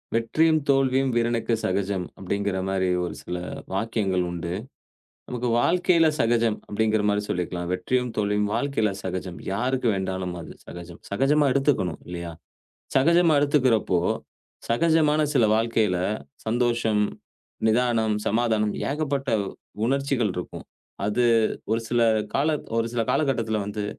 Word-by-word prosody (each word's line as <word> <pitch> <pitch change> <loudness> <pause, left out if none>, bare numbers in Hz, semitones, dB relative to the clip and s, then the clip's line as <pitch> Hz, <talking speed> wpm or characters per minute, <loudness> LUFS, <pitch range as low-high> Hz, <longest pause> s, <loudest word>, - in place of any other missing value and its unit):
"வெற்றியும், 155 +8 +3
தோல்வியும் 135 -1 +2
வீரனுக்கு 115 -1 +1
சகஜம்" 95 -1 -1
அப்டீங்கிற 100 0 -2
மாரி 95 -1 0 0.2
ஒரு 85 - -5
சில 90 - -5 0.4
வாக்கியங்கள் 100 -3 0
உண்டு. 85 -1 -4 0.8
நமக்கு 125 0 -2
வாழ்க்கைல 175 +2 +3
சகஜம் 115 -1 +2
அப்டீங்கிற 110 0 +1
மாரி 105 0 +1
சொல்லிக்கலாம். 90 0 -2
வெற்றியும் 125 +6 0
தோல்வியும் 105 0 +1
வாழ்க்கைல 115 -3 0
சகஜம். 90 -1 -4
யாருக்கு 125 +5 0
வேண்டாலும் 95 -1 -3
அது 85 - -9
சகஜம். 85 0 -10
சகஜமா 140 +7 +2
எடுத்துக்கணும். 135 - +1
இல்லையா? 85 -1 -5 0.6
சகஜமா 170 +4 +4
எடுத்துக்கிறப்போ, 130 -10 +2 0.7
சகஜமான 155 +4 +3
சில 120 -5 +4
வாழ்க்கைல 110 -4 +1 0.5
சந்தோஷம், 115 -2 +1 0.7
நிதானம், 115 -1 +2
சமாதானம் 110 -2 +1 0.2
ஏகப்பட்ட 140 -2 -2 0.6
உணர்ச்சிகள் 135 -5 0
இருக்கும். 90 - -6 0.4
அது 115 +4 +1 0.5
ஒரு 115 - +1
சில 120 0 +1 0.3
கால 140 +3 +2 0.3
ஒரு 115 - +1
சில 120 -1 0
காலகட்டத்துல 115 -7 0
வந்து, 105 0 -4
115 Hz, 115 wpm, -25 LUFS, 100-135 Hz, 0.8 s, சகஜமா